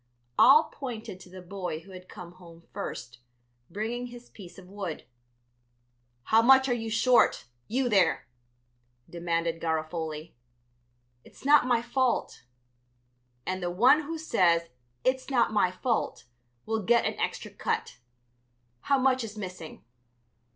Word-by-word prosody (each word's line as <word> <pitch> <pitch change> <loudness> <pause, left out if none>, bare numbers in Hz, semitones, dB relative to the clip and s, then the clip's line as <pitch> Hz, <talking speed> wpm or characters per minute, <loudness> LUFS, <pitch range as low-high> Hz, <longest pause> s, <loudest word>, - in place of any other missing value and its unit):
All 300 +4 +8
pointed 230 -8 -7
to 180 - -14
the 185 0 -11
boy 180 -3 -5
who 190 +3 -16
had 185 0 -12
come 175 -1 -10
home 170 -2 -16
first, 120 +1 -6 0.5
bringing 230 +6 -4
his 240 0 -13
piece 180 -4 -13
of 185 -2 -13
wood. 190 -4 -6 1.2
"How 225 - +4
much 265 +2 +6
are 250 - +1
you 225 -2 -3
short, 240 +3 +3 0.2
you 255 +3 0
there?" 200 -6 +2 0.8
demanded 170 -1 -2
Garofoli. 160 -1 -3 0.9
"It's - - -18
not 290 -2 +5
my 235 -2 +2
fault." 255 - -1 1.0
"And 185 0 -3
the 175 - -2
one 245 +12 +5
who 325 +2 -5
says 170 - +2 0.3
'it's 260 +1 0
not 245 -4 +2
my 205 -4 +3
fault' 225 +6 -2 0.4
will 220 0 -1
get 235 +4 +3
an - - -2
extra - - -3
cut. 450 - -3 0.8
How 275 - +1
much 260 -1 +2
is 215 -1 -8
missing?" 180 - -8
205 Hz, 135 wpm, -28 LUFS, 175-245 Hz, 1.2 s, All